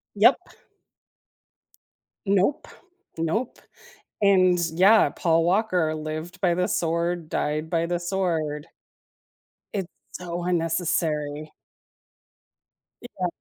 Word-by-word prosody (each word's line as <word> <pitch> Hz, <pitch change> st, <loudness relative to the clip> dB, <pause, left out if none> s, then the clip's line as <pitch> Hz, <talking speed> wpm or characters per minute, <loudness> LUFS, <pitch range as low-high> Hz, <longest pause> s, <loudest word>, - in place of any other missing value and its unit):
Yep. -, -, +6 dB, 1.9 s
Nope, 200 Hz, +8 st, +1 dB, 0.5 s
nope, 165 Hz, +10 st, -2 dB, 0.6 s
and 185 Hz, -3 st, +4 dB, 0.2 s
yeah, 200 Hz, +6 st, +6 dB
Paul 165 Hz, -2 st, +1 dB
Walker 180 Hz, -4 st, +1 dB
lived 155 Hz, +4 st, -6 dB
by 175 Hz, -2 st, +3 dB
the 180 Hz, +1 st, +1 dB
sword, 170 Hz, 0 st, -1 dB
died 155 Hz, +2 st, -2 dB
by 165 Hz, -1 st, +1 dB
the 175 Hz, 0 st, -1 dB
sword. 170 Hz, -5 st, -2 dB, 1.1 s
It's 190 Hz, -4 st, -3 dB, 0.2 s
so 175 Hz, -1 st, -5 dB
unnecessary. 160 Hz, -3 st, -1 dB, 1.5 s
Yeah. 190 Hz, -7 st, -4 dB
175 Hz, 85 wpm, -25 LUFS, 160-185 Hz, 1.9 s, Yep